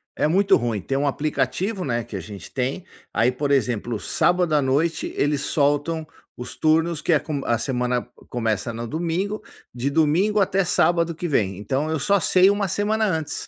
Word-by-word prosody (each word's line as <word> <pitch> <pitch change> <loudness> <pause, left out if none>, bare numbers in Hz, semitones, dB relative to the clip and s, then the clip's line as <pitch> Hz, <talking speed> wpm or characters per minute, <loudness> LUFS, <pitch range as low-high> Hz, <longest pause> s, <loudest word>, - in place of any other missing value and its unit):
é - - +1
muito 190 +5 +4
ruim, 115 -4 -2
tem 135 - -2
um 145 +1 +1
aplicativo, 155 - -1
né, 120 -3 -1
que 110 -3 -9
a - - -4
gente 100 +3 -10
tem, 135 +7 -2 0.3
aí 120 +3 +3
por 140 +3 -2
exemplo, 120 -4 0
sábado 175 - +1
à 150 - +4
noite 145 +5 0
eles 145 -1 +1
soltam 145 +3 0 0.3
os 125 - -7
turnos 160 0 +2
que 170 - +2
é 155 - +4
com 145 -2 -4
a 120 - +2
semana 125 -1 -1
c - - -24 0.2
começa 115 -1 -1
no 115 +1 -5
domingo, 175 - -2 0.3
de 125 +3 -1
domingo 165 +8 +2
até 190 -1 +2
sábado 170 -1 +2
que 175 - -4
vem. 100 -9 +1
Então 135 +9 -2
eu 160 - 0
só 200 +8 +2
sei 185 +2 +5
uma 200 -1 +1
semana 210 +3 0
antes. 160 -7 -2
150 Hz, 190 wpm, -23 LUFS, 125-175 Hz, 0.3 s, sei